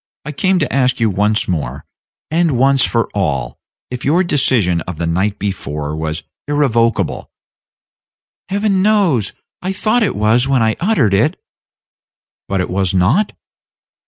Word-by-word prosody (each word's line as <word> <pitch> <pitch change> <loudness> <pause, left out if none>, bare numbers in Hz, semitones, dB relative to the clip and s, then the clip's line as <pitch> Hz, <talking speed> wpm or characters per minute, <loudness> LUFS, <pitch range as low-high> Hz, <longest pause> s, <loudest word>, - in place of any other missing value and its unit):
I 150 - -4
came 185 +6 +1
to 145 -7 -1
ask 130 -1 +2
you 115 -2 +2
once 105 +3 +1
more, 70 -6 -3 0.5
and 165 -5 +2
once 135 +1 +3
for 115 -1 +1
all, 75 -11 -2 0.3
if 125 -1 -5
your 165 +7 +3
decision 120 - +1
of 90 -3 -5
the 85 - -2
night 95 +5 0
before 75 -7 -4
last 75 - -5
was 80 0 -3 0.2
irrevocable?" 120 -6 0 1.2
"Heaven 200 -1 +1
knows 190 - +2 0.3
I 185 - -2
thought 215 +5 +1
it 215 - +1
was 110 +5 +2
when 135 -4 +2
I 110 0 +1
uttered 175 - +2
it." 135 - +1 1.1
"But 95 -1 0
it - - -3
was 95 0 0
not?" 115 - +2
115 Hz, 150 wpm, -17 LUFS, 95-155 Hz, 1.2 s, once